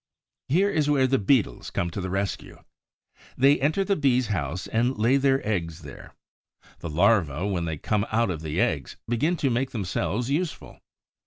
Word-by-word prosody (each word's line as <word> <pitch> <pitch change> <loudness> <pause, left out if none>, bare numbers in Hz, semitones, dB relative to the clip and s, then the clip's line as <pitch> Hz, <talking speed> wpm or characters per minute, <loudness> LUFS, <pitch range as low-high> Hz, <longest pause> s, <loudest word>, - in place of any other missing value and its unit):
Here 190 +9 +2
is 150 -4 +1
where 140 -3 +3
the 135 0 +2
Beetles 105 - +1
come 85 0 -2
to 100 - -4
the 95 - -4
rescue. 95 +1 -4 0.7
They 140 +3 +4
enter 155 +8 +2
the 200 0 +1
Bee's 130 -6 +1
house 85 -3 -2
and 120 +3 0
lay 115 +6 +3
their 135 -3 +1
eggs 85 -6 -2
there. 70 -2 -12 0.6
The 85 - -6
larvæ, 90 0 +2
when 85 -3 -1
they 80 -2 -3
come 105 +7 -1
out 115 -2 +1
of 80 -3 -5
the 75 -1 -3
eggs, - - -1
begin 150 +10 0
to 135 -4 0
make 125 +3 0
themselves 115 +3 -2
useful. 165 +3 -3
115 Hz, 175 wpm, -25 LUFS, 90-135 Hz, 0.7 s, They